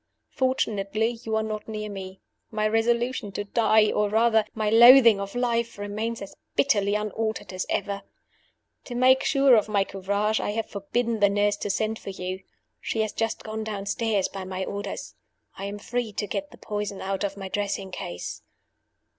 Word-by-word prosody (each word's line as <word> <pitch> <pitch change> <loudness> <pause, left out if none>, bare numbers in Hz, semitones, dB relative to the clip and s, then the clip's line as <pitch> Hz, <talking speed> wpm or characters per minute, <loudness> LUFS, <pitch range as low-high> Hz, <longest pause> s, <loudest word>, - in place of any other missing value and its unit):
Fortunately, 220 -5 0
you 220 -1 -2
are 220 - +1
not 215 -1 -5
near 215 -1 -4
me 190 -2 -8 0.3
my 215 -1 0
resolution 235 0 0
to 205 - -2
die, 215 0 +3
or, 210 0 +1
rather, 220 0 +3
my 215 -1 -1
loathing 235 0 +8
of 200 +2 -5
life, 235 -2 0
remains 210 +2 -3
as 195 - -10 0.2
bitterly 205 -7 +2
unaltered 210 -1 -3
as 185 - -3
ever. 200 0 -1 0.8
To 245 - -6
make 260 +2 +5
sure 275 -2 +5
of 215 -1 +2
my 200 -2 +3
courage, 200 +3 -1
I 205 - -2
have 225 0 -1
forbidden 225 +3 -2
the 200 -1 +5
nurse 205 +1 +2
to - - -4
send 220 +2 -1
for - - -8
you. 185 0 -5 0.4
She 225 - -2
has 215 -1 -2
just 225 0 -2
gone 220 0 -4
downstairs 210 0 -1
by 195 -1 -7
my 185 0 -4
orders. 200 0 -5 0.4
I 195 - -6
am 200 +1 -5
free 240 +2 -3
to 205 - -2
get 290 +8 -4
the - - -15
poison 205 -1 -4
out 195 +1 -2
of 200 0 -2
my 195 -1 -5
dressing 200 -1 -3
case. 90 - -6
210 Hz, 180 wpm, -26 LUFS, 200-225 Hz, 0.8 s, loathing